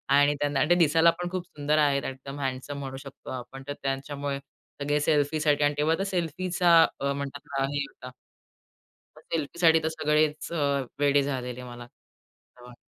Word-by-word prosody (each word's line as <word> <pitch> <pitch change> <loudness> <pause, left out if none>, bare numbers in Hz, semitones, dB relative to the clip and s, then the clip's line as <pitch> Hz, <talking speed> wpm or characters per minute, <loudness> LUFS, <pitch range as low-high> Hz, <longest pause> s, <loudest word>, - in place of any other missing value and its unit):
आणि 145 +1 +4
त्यांना 145 -1 0
अन् 145 - +2
ते 175 - +6
दिसायला 165 0 +5
पण 175 0 -2
खूप 185 -1 -3
सुंदर 150 -2 -1
आहेत, 145 -2 +3
एकदम 135 +2 -7
हँडसम 135 +1 -3
म्हणू 135 -1 -6
शकतो 135 0 -11
आपण. 130 +1 -7
तर 145 - -2
त्यांच्यामुळे 140 +1 -3 0.4
सगळे 145 +1 +1
सेल्फी 150 0 +2
साठी 150 -1 +2
आणि 145 0 +3
तेव्हा 155 +2 +2
तर 195 - +1
सेल्फीचा 175 -2 +3 0.2
म्हणतात 140 0 -3
हे 140 +1 0
होता. 125 -1 -11 1.1
सेल्फीसाठी 165 +1 +2
तर 160 - +1
सगळेच 155 0 0
अ, 170 - -2 0.4
वेडे 145 0 +4
झालेले 125 -3 -4
मला. 120 0 -9 0.7
हां. 125 0 -13
145 Hz, 160 wpm, -27 LUFS, 135-160 Hz, 1.1 s, ते